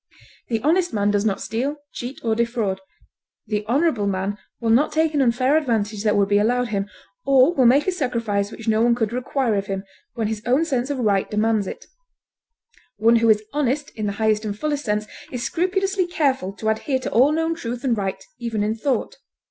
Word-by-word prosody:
The 225 -2 -2
honest 340 +1 +2
man 205 -1 +2
does 205 0 +1
not 200 -3 0
steal, 255 +7 -2 0.2
cheat, 245 +3 -6
or 225 -2 +1
defraud; 225 -4 -1 0.6
the 210 -1 -2
honorable 250 -4 +1
man 195 +1 -2 0.2
will 230 -2 0
not 270 +7 +4
take 315 0 +1
an 290 - +2
unfair 255 +3 +2
advantage 220 -8 0
that 210 -1 +2
would 200 -1 +3
be 205 0 +3
allowed 245 +3 +1
him, 200 -1 -2 0.3
or 275 +4 +5
will 260 -7 +4
make 275 +5 +4
a 375 - +1
sacrifice 230 - -1
which 225 0 -10
no 220 0 +3
one 235 0 +4
could 225 -2 -1
require 250 -1 0
of 200 -1 -1
him, 195 -1 -3 0.3
when 225 - -1
his 215 0 -3
own 265 +7 +3
sense 260 -4 -1
of 285 - -2
right 205 -5 +1
demands 215 -1 +1
it. - - -7 1.1
One 230 +2 +4
who 230 0 +3
is 215 -1 +4
honest 290 0 -1
in 215 -2 -4
the 200 - -2
highest 215 0 +1
and 205 -1 -4
fullest 295 +2 -2
sense 210 -1 0 0.3
is 245 -2 -4
scrupulously 375 +6 0
careful 270 - 0
to 220 +2 -2
adhere 260 +5 0
to 260 - -5
all 260 +6 +5
known 325 +1 0
truth 245 -7 -5
and 250 -4 +2
right 195 -2 -3
even 230 -3 -2
in 210 +1 0
thought. 260 - -2
235 Hz, 205 wpm, -22 LUFS, 210-275 Hz, 1.1 s, or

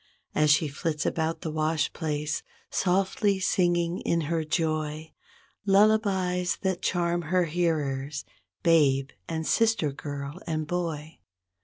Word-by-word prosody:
As 150 0 +3
she 150 +2 +4
flits 150 +2 -2
about 160 0 -1
the 160 - -3
wash 155 -1 0
place, 150 -1 -2 0.3
softly 195 +2 +1
singing 175 -2 +1
in 170 - 0
her 160 +1 -1
joy 155 -1 -2 0.5
Lullabies 195 -3 +3
that 190 -2 0
charm 175 -1 +1
her 180 +3 +1
hearers, 150 -4 -1 0.4
babe 140 -5 +4 0.2
and 160 -1 -2
sister 225 -10 +2
girl 145 +3 -6
and 155 -1 -1
boy. 160 -2 -3
165 Hz, 120 wpm, -27 LUFS, 150-180 Hz, 0.5 s, she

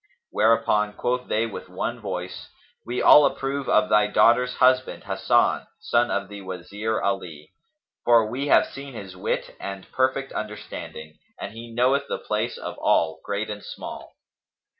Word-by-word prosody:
Whereupon 105 -1 +2
quoth 125 +3 -2
they 110 +2 +1
with 110 - -8
one 115 +6 -3
voice, 95 -4 -6 0.4
"We 125 +1 -2
all 150 - +9
approve 135 0 -3
of 105 - +4
thy 105 0 +4
daughter's 120 +4 +4
husband 130 0 +2
Hasan, 100 +5 +1
son 120 -7 +1
of 100 - -1
the 100 0 -9
Wazir 100 +4 -4
Ali; 85 -7 -4 0.5
for 115 -2 +5
we 130 +6 -3
have - - +5
seen 135 -2 -9
his 95 -4 -8
wit 90 - -3
and 95 -1 -6
perfect 130 +1 0
understanding, 105 -7 -7 0.2
and 100 - -6
he 115 +1 -9
knoweth 130 +4 +2
the - - -2
place - - -2
of - - -7
all, 80 -1 +2
great 105 +1 -3
and 105 -1 -6
small." - - -8
110 Hz, 155 wpm, -24 LUFS, 100-125 Hz, 0.5 s, all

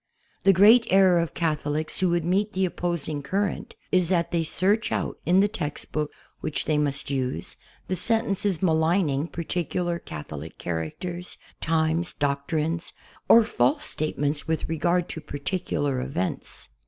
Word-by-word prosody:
The 195 - +8
great 220 +6 +6
error 190 -2 +5
of 170 -1 -2
Catholics 155 -1 -1
who 185 -1 +3
would 170 -1 +1
meet 200 +4 +1
the 190 0 +1
opposing 170 -4 -2
current 195 +7 -2 0.2
is 180 -2 +3
that 170 -3 +1
they 170 -1 +1
search 195 +7 +1
out - - -2
in 180 +3 +5
the 205 - +4
textbook 150 -6 -3 0.3
which 155 - -2
they 155 -1 +1
must 140 -1 -1
use, 130 -10 -2 0.3
the 185 - -1
sentences 200 -4 +1
maligning 160 -3 +2
par 170 - -5
ticular 175 +1 -2
Catholic 75 0 -8
characters, 170 - -4 0.2
times, 160 +1 0
doctrines, 150 +4 -1 0.4
or 230 - +8
false 290 +6 +1
state 155 0 -3
ments 145 +2 -1
with 160 0 -1
regard 170 +2 +1
to 160 - -5
particular 145 -3 -2
events. 125 -9 -4
165 Hz, 145 wpm, -25 LUFS, 150-185 Hz, 0.4 s, The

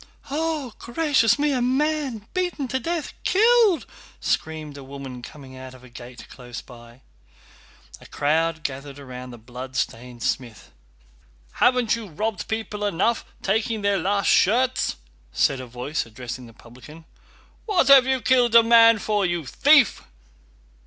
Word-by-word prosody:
"Oh, 305 -5 -2
gracious 255 -3 +2
me, 295 0 +1
a 255 -3 0
man 265 -3 -1
beaten 355 -7 -2
to 260 - -1
death—killed!..." 385 - +2 0.3
screamed 155 -2 -3
a 140 - -10
woman 135 -2 -9
coming 130 +1 -12
out 130 0 -10
of 130 - -17
a 125 - -14
gate 120 0 -12
close 120 -2 -9
by. 120 0 -15 1.0
A - - -15
crowd 160 +2 0
gathered 140 0 -6
round 125 -2 -9
the 120 - -10
bloodstained 125 0 -6
smith. 120 -4 -4 0.8
"Haven't 245 -3 +2
you 230 -2 -7
robbed 210 +5 -3
people 220 -2 -4
enough—taking 215 +2 -1
their 200 -1 +2
last 200 0 0
shirts?" 250 +6 +2 0.4
said 135 - +1
a 130 - -8
voice 125 +6 -3
addressing 125 +2 -8
the 115 - -15
publican. 130 +8 -15 0.6
"What 375 -10 +2
have 270 -2 +8
you 265 -1 +1
killed 245 -3 +3
a 230 - +9
man 230 0 +6
for, 210 0 -1
you 175 -4 -1
thief?" 280 - +4
200 Hz, 140 wpm, -23 LUFS, -, 1.0 s, a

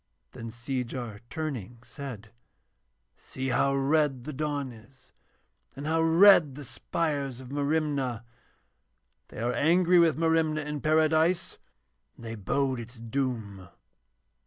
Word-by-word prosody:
Then 115 - -8
Seejar 120 -2 -4
turning 125 -8 -5
said: 115 -7 -8 0.8
'See 130 0 -5
how 140 +2 +2
red 135 -2 +1
the 150 - -6
dawn 145 -2 -2
is 115 +4 -18 0.6
and 140 +2 -7
how 160 +1 +1
red 165 -3 +6
the 145 - -8
spires 140 -1 -3
of 130 0 -10
Merimna. 140 -5 -1 1.0
They - - -13
are 120 +1 0
angry 175 +3 +4
with 165 -3 +4
Merimna 160 -1 +2
in 150 -1 -4
Paradise 160 +3 +2 0.6
and 115 - -13
they 115 - -5
bode 130 +5 -1
its 120 +2 -9
doom.' 115 -6 -3
140 Hz, 120 wpm, -28 LUFS, 120-155 Hz, 1.0 s, red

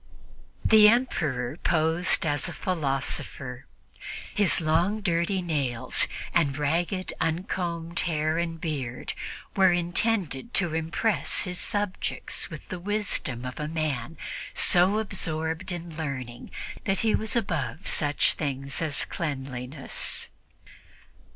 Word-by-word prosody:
The 215 -1 +8
Emperor 155 - 0
posed 165 +2 +2
as 145 -2 +1
a - - -6
philosopher. 135 -5 -2 0.7
His 205 -3 +3
long, 170 +7 +2
dirty 180 0 +1
nails 140 -8 +2 0.3
and 145 -5 +2
ragged, 170 +5 0
uncombed 170 0 -1
hair 155 -1 +1
and 165 -1 -2
beard 140 -7 -3 0.4
were 190 -2 +6
intended 175 - 0
to 175 -4 +2
impress 165 +7 +1
his 180 -2 -3
subjects 205 -2 -1
with - - -9
the 185 - -4
wisdom 190 - -1
of 125 +3 -6
a 150 - -2
man 155 -2 -2 0.4
so 185 +3 +5
absorbed 165 -5 -1
in 170 -2 -6
learning 130 -6 -5 0.4
that 195 -1 +1
he 220 -1 +2
was 220 +4 0
above 175 - -1
such 145 -2 +3
things 140 -1 -3
as 155 -3 +2
cleanliness. 135 -3 -2
165 Hz, 110 wpm, -27 LUFS, 145-185 Hz, 0.7 s, The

